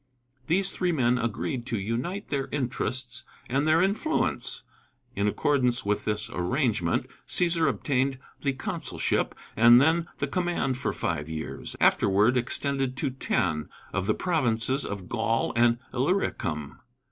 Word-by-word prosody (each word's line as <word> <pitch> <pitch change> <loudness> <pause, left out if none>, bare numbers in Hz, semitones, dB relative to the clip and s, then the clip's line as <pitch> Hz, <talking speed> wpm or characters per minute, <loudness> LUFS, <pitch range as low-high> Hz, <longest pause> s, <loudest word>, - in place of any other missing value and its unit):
These 190 +3 +2
three 180 -1 0
men 125 -5 +2
agreed 120 +2 -2
to 115 - -1
unite 120 - -3
their 140 -2 -1
interests 130 -2 -3 0.2
and 135 +4 0
their 160 +3 +5
influence. 220 +12 0 0.5
In 100 +1 +1
accordance 125 +1 +1
with 105 0 0
this 105 0 -1
arrangement 100 - 0 0.2
Cæsar 170 -3 +2
obtained 135 -1 0 0.2
the 140 -2 0
consulship, 130 0 -2 0.2
and 120 +2 +8
then 165 +4 +3
the - - -1
command 170 -5 -1
for - - -1
five 80 -2 -2
years, 80 -1 -5
afterward 105 +5 +4
extended 135 +1 0
to 140 -2 -1
ten, 80 - -1 0.2
of 95 0 -1
the 110 - +2
provinces 130 -6 +1
of 100 -3 -5
Gaul 115 0 0
and 120 0 +4 0.2
Illyricum. 120 - -1
125 Hz, 135 wpm, -27 LUFS, 110-145 Hz, 0.5 s, and